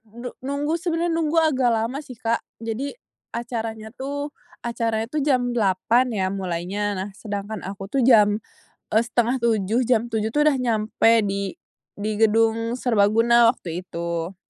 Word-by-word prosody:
nu 245 +1 -6
nunggu, 285 +5 -2
sebenernya 340 0 0
nunggu 320 0 0
agak 265 -5 +2
lama 230 +5 -1
sih 260 -5 -10
Kak. 230 +1 0 0.2
Jadi, 230 - -3 0.4
acaranya 225 -2 -4
tuh 285 +4 -5 0.3
acaranya 230 -2 -1
tuh 305 - 0
jam 250 -4 +2
8:00 225 +3 +2
ya, 190 -1 0
mulainya. 185 +1 -3
Nah, 190 +2 -4
sedangkan 205 0 -5
aku 195 0 -7
tuh 275 - +1
jam, 215 -4 +5 0.5
eee, 220 +2 +4
6:30, 235 -2 +1
jam 240 -1 +2
7.00 220 0 -1
tuh, 295 - +4
udah 280 -3 +4
nyampe 225 -1 +3
di 200 -1 -2 0.4
di 210 +1 -2
gedung 225 +1 +3
serbaguna, 230 0 +4
waktu 170 -4 -6
itu. 170 +1 -4
225 Hz, 145 wpm, -23 LUFS, 205-250 Hz, 0.5 s, jam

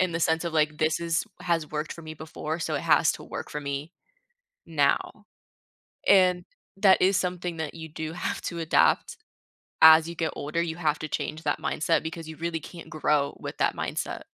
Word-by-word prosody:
in 185 -1 +2
the 165 - -1
sense 160 +1 +1
of, 170 - -3
like, 150 -1 +1
this 155 0 +2
is 165 -1 0 0.2
has 165 -3 -1
worked 155 +1 -3
for 165 - -11
me 155 0 -8
before, 155 0 -5
so 170 - -2
it - - 0
has - - +4
to - - -9
work - - -6
for 150 - -4
me 140 +3 -4 0.7
now. - - 0 0.8
And, 185 -2 +5 0.3
that 195 -1 +5
is 190 +1 +4
something 180 -2 -2
that 160 -2 -4
you 160 -1 -8
do 160 +1 -5
have 230 +7 -3
to 170 - -4
adapt, 165 0 +2 0.6
as 160 0 +9
you 170 - -7
get 165 -1 -1
older, 155 +4 -2
you 165 -1 -3
have 155 -3 +1
to 155 - -4
change 155 +2 -3
that 145 - 0
mindset 165 +2 +1
because 160 0 -6
you 160 - -9
really 165 0 -3
can't 170 +2 -11
grow 150 -2 0
with - - -7
that - - +1
mindset. - - -3
160 Hz, 200 wpm, -27 LUFS, 155-170 Hz, 0.8 s, as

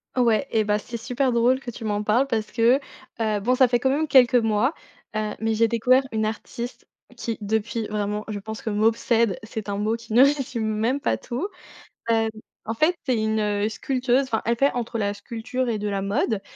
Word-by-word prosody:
Ouais 245 +1 +2
et 220 -1 +2
bah, 210 0 +1
c'est 235 +3 -8
super 250 +3 0
drôle 240 +2 +3
que 250 -2 -7
tu 230 - -10
m'en 210 -1 -1
parles 225 +6 +3
parce 220 -4 -1
que, 235 +4 +4 0.4
heu, 215 -2 +1
bon, 245 +5 +2
ça 260 0 +5
fait 240 0 +1
quand 265 - +1
même 300 +4 +1
quelques 260 -3 +6
mois, 225 +4 +2 0.4
heu, 215 -1 -1
mais 225 0 +1
j'ai 230 +1 +4
découvert 250 +4 +3
une 220 0 0
artiste 235 +2 -6 0.3
qui, 230 -1 -3
depuis 220 +2 -1
vraiment, 210 0 -2
je 210 -1 -3
pense 220 +2 -7
que - - -3
m'obsède, 225 0 +2
c'est 220 -1 -6
un 200 0 -2
mot 215 +2 0
qui 230 -1 -9
ne 245 +3 +8
résume 270 -5 +1
même 220 +5 0
pas - - +1
tout, 265 +12 -4 0.6
hem, 225 -1 +2 0.4
en 225 - -2
fait, 310 +9 +2
c'est 255 -3 +2
une, 220 0 0
heu, 205 0 0
sculpteuse. 255 +3 0
Enfin, 225 -4 -2
elle 235 +1 +2
fait 275 +4 +3
entre 240 -1 -3
la 205 -1 0
sculpture 235 +5 -4
et 225 -2 0
de 210 0 -2
la 200 -1 -2
mode 200 +1 0
225 Hz, 215 wpm, -24 LUFS, 215-250 Hz, 0.6 s, ne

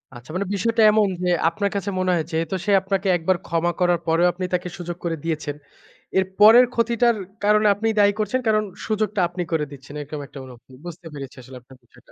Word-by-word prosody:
আচ্ছা 120 +3 -13
মানে 200 +2 -1
বিষয়টা 230 +3 +1
এমন 210 -1 +3 0.2
যে 180 - +1 0.2
আপনার 200 +4 -2
কাছে 200 0 -2
মনে 185 0 0
হয় 165 -2 +1
যে - - -16
যেহেতু 165 +3 -1
সে 205 - +1
আপনাকে 195 0 -2
একবার 175 +2 0
ক্ষমা 170 +1 0
করার 175 -2 +2
পরেও 165 +2 +3
আপনি 185 +1 -4
তাকে 180 0 -1
সুযোগ 175 -1 -6
করে 165 -1 -1
দিয়েছেন। 155 -3 -3 0.6
এর 190 - +3
পরের 230 +4 +8
ক্ষতিটার 235 0 +2 0.3
কারণে 210 0 +4
আপনি 220 +3 -2
দায়ী 205 0 +5
করছেন 215 +5 0
কারণ 215 -1 +3 0.2
সুযোগটা 215 -2 -1
আপনি 175 0 -4
করে 155 -2 0
দিচ্ছেন 140 +1 -12
এরকম 150 +1 -7
একটা 140 - -11
অনুভূতি। 125 +1 -15
বুঝতে 170 0 -9
পেরেছি 135 -2 -8
আসলে 130 +1 -12
আপনার 130 +1 -18
বিষয়টা। - - -23
180 Hz, 210 wpm, -22 LUFS, 160-210 Hz, 0.6 s, পরের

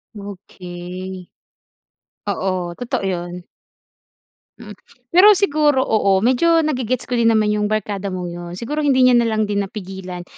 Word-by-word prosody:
Okey. 185 -2 -9 1.0
Oo, 185 -3 -2
totoo 240 -4 -3
'yon. 175 -1 -4 1.2
Mm, 210 -1 -10 0.4
pero 410 +4 +9
siguro 300 -7 +2
oo, 200 -3 +2
medyo 260 - +3
nage-gets 255 -6 -1
ko 250 - -1
din 230 -1 +3
naman 215 -1 +2
yung 210 0 0
barkada 205 -2 -2
mong 180 -1 -4
yun. 175 0 -8
Siguro 295 +6 -3
hindi 270 -2 +3
niya 250 - +5
na 240 - +4
lang 215 -1 0
din 205 -1 0
napigilan 190 -3 -7
205 Hz, 140 wpm, -19 LUFS, 185-245 Hz, 1.2 s, pero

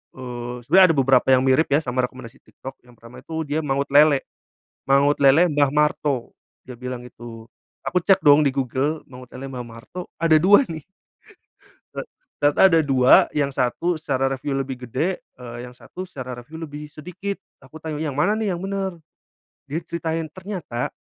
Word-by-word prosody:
eee, 125 -1 -6
sebenernya 185 +8 +6
ada - - -1
beberapa 135 -2 +3
yang 130 - +2
mirip 135 +4 +3
ya 145 +3 +2
sama 125 -1 -3
rekomendasi 130 -3 -13
TikTok, 135 +1 -12
yang 120 - -18
pertama 115 +2 -14
itu 160 0 -5
dia 150 +1 -2
Mangut 140 -2 -2
Lele. 145 -1 +5 0.6
Mangut 140 +2 +3
Lele 145 +5 +5
Mbah 145 -2 +2
Marto, 150 -4 0 0.3
dia 125 -2 -11
bilang 125 -1 -6
itu. 115 -1 -11 0.3
Aku 180 - 0
cek 185 0 +3
dong 145 -1 +6
di 135 - +1
Google, 135 +4 -1
Mangut 125 -1 -12
Lele 135 +1 -7
Mbah 125 -2 -6
Marto 115 +10 -9 0.2
ada 160 -2 +5
2 200 - +6
nih. 160 -2 -6 1.2
Ek - - -3 0.3
tata 145 +6 +5
ada 165 - +5
2, 130 -2 +5
yang 140 -2 +1
satu 135 +7 -1
secara 135 -2 -1
reviu 135 +1 -3
lebih 130 -2 -4
gede, 165 +10 -1 0.2
eee, 120 -1 -9
yang 125 - -13
satu 185 +8 -9
secara 130 -6 -7
reviu 150 +7 -13
lebih 150 -1 -7
sedikit, 180 +6 -6 0.2
aku 140 +4 -14
tanya, 155 -2 -4
"Yang 150 -4 -3
mana 150 +8 +2
nih 205 -4 -1
yang 170 - -7
bener?" 195 -1 -2 0.7
Dia 150 +4 -3
ceritain, 165 -1 -3
ternyata, 185 - -5
140 Hz, 175 wpm, -22 LUFS, 130-160 Hz, 1.2 s, sebenernya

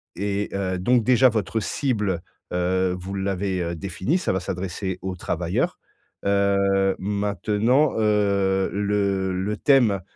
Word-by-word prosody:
et 100 +1 -2
heu, 95 -2 -1
donc 120 +5 +3
déjà 130 +1 +5
votre 110 0 -1
cible, 105 - -1 0.3
heu, 90 +1 +1
vous 95 +2 -7
l'avez, 95 -1 -1
heu, 85 0 -2
définie? 95 - -1
Ca 180 - -1
va 95 - 0
s'adresser 95 +1 -4
aux 95 -1 -3
travailleurs. - - -2 0.5
Heu, 100 -1 +2
maintenant, 105 - +1
heu, 100 -3 +2
le 100 -2 0
le 100 +3 -2
thème 120 -9 +3
100 Hz, 130 wpm, -23 LUFS, 95-105 Hz, 0.5 s, déjà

